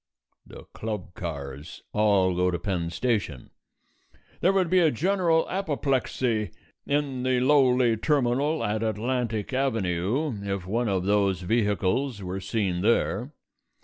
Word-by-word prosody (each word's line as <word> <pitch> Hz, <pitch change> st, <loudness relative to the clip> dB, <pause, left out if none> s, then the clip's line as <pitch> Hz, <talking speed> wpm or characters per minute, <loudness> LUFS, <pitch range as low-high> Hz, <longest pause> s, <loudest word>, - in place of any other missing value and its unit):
The -, -, -11 dB
club 105 Hz, -5 st, -5 dB
cars 70 Hz, -3 st, -7 dB
all 100 Hz, -3 st, +3 dB
go 90 Hz, +1 st, +2 dB
to 90 Hz, -, -1 dB
Penn 85 Hz, -1 st, -2 dB
Station: 100 Hz, -, -2 dB, 0.9 s
there 185 Hz, -, +3 dB
would 190 Hz, -2 st, +2 dB
be 185 Hz, +2 st, +3 dB
a 165 Hz, -3 st, +5 dB
general 170 Hz, -, +1 dB
apoplexy 135 Hz, -, -1 dB, 0.4 s
in 140 Hz, -3 st, -1 dB
the 130 Hz, 0 st, +1 dB
lowly 130 Hz, -3 st, +4 dB
terminal 145 Hz, +3 st, +1 dB
at 105 Hz, +1 st, -1 dB
Atlantic 115 Hz, +1 st, -2 dB
Avenue 115 Hz, -, 0 dB
if 100 Hz, -2 st, -3 dB
one 115 Hz, +4 st, -1 dB
of 95 Hz, -2 st, 0 dB
those 100 Hz, -2 st, +2 dB
vehicles 105 Hz, +3 st, 0 dB
were 90 Hz, +1 st, -4 dB
seen 95 Hz, -2 st, -1 dB
there. 115 Hz, +5 st, +1 dB
110 Hz, 125 wpm, -26 LUFS, 95-135 Hz, 0.9 s, a